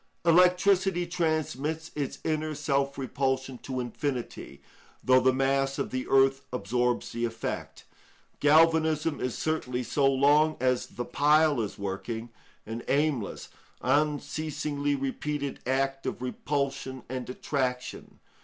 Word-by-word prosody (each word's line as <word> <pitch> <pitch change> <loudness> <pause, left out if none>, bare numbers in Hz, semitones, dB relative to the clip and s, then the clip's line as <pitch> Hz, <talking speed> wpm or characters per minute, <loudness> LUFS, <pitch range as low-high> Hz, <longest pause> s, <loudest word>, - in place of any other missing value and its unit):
Electricity 180 +1 +4
transmits 160 -2 -2
its 145 -3 -3
inner 155 -1 -1
self 140 -1 0
repulsion 130 -1 -2
to 130 -1 -4
infinity, 120 - -4 0.4
though 130 0 +6
the 130 +1 +4
mass 135 +1 +1
of - - -2
the 130 0 -3
earth 135 0 +4
absorbs 125 +2 -1
the 120 - -3
effect. 115 -1 -4 0.6
Galvanism 160 0 +4
is 125 -2 -2
certainly, 130 -6 -1
so 140 +3 +2
long 145 +3 +4
as 125 0 +1
the 120 - -6
pile 150 -2 +3
is 105 - -4
working, 110 +4 -4 0.4
an 115 +2 -5
aimless, 140 -6 0 0.3
unceasingly 145 +1 0
repeated 140 +1 -3
act 135 +1 0
of - - -3
repulsion 135 0 -3
and 130 0 -5
attraction. 125 -1 -3
135 Hz, 115 wpm, -28 LUFS, 125-155 Hz, 0.6 s, though